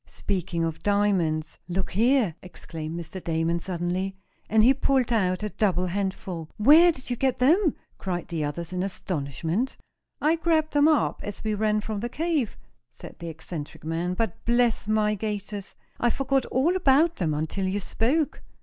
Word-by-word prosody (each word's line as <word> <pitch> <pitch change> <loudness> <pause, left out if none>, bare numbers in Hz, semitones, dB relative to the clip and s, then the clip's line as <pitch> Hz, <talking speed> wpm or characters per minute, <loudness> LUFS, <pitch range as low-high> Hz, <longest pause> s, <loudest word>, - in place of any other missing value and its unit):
"Speaking 180 -3 -2
of 165 -1 -3
diamonds, 185 -7 +1
look 185 +1 -2
here!" 230 -2 +3
exclaimed 165 -2 -7
Mr. 175 +2 -8
Damon, 165 +1 0
suddenly, 180 +2 -2 0.3
and 220 0 +5
he 255 +4 +7
pulled 265 -3 +1
out 185 -3 +1
a 210 - -1
double 185 -4 +1
handful. 185 -3 -3
"Where 310 +10 +7
did 260 -5 -7
you - - +1
get 260 +1 +1
them?" 315 +6 +4 0.2
cried 180 -2 -3
the 165 -3 -2
others 170 +4 -4
in 180 - -1
astonishment. 175 - -2 0.4
"I 315 +3 +2
grabbed 320 -1 +1
them 290 +1 +5
up, 310 -2 +2
as 205 - -6
we 215 -1 0
ran 215 0 +1
from 215 -1 -4
the 240 +3 -3
cave," 300 -3 -1 0.3
said 130 - -12
the 170 -1 -5
eccentric 160 -2 -7
man; 165 +3 -2
"but, 225 -3 -2
bless 235 -2 +2
my 215 -1 +2
gaiters! 205 -1 -4 0.2
I 240 - +3
forgot 270 +1 0
all 300 +8 +2
about 325 -1 +4
them 160 -5 0
until 160 +6 -2
you 195 +2 -1
spoke. 275 - 0
205 Hz, 165 wpm, -26 LUFS, 175-255 Hz, 0.4 s, he